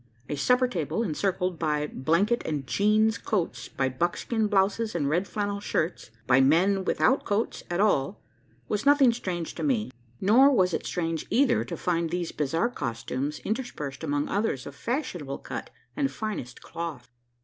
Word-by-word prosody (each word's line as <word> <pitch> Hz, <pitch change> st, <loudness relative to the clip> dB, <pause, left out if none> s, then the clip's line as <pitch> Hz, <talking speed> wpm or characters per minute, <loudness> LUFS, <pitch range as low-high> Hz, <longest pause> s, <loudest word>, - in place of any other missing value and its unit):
A 145 Hz, -, -1 dB
supper 250 Hz, -, +3 dB
table, 190 Hz, -, -2 dB
encircled 180 Hz, -1 st, -1 dB
by 150 Hz, -2 st, 0 dB
blanket 170 Hz, -, +1 dB
and 145 Hz, -4 st, -3 dB
"jeans" 215 Hz, -, +2 dB
coats 165 Hz, -, -2 dB
by 135 Hz, -, 0 dB
buckskin 175 Hz, -, -1 dB
blouses 205 Hz, +2 st, +1 dB
and 140 Hz, -, 0 dB
red 175 Hz, +7 st, +1 dB
flannel 205 Hz, -1 st, -2 dB
shirts 170 Hz, -, -2 dB, 0.2 s
by 130 Hz, +1 st, +5 dB
men 185 Hz, +8 st, +4 dB
without 265 Hz, +8 st, +2 dB
coats 210 Hz, +3 st, -1 dB
at 175 Hz, +1 st, -1 dB
all 195 Hz, -5 st, +2 dB, 0.5 s
was 210 Hz, -, -1 dB
nothing 280 Hz, -4 st, +5 dB
strange 175 Hz, -8 st, -4 dB
to -, -, -7 dB
me; 235 Hz, -, 0 dB, 0.3 s
nor 240 Hz, +8 st, +6 dB
was 185 Hz, -9 st, +3 dB
it -, -, -2 dB
strange 165 Hz, -3 st, -2 dB
either 250 Hz, -2 st, +3 dB
to 170 Hz, -, -5 dB
find 170 Hz, -1 st, 0 dB
these 175 Hz, 0 st, -2 dB
bizarre 165 Hz, -, 0 dB
costumes 130 Hz, -, -3 dB
interspersed 165 Hz, -, -4 dB
among 145 Hz, -1 st, 0 dB
others 200 Hz, -, -1 dB
of 140 Hz, -, -7 dB
fashionable 175 Hz, -, -3 dB
cut -, -, -6 dB, 0.3 s
and 280 Hz, -2 st, +1 dB
finest 210 Hz, -, -5 dB
cloth. 165 Hz, -7 st, -6 dB
180 Hz, 160 wpm, -27 LUFS, 150-220 Hz, 0.5 s, nor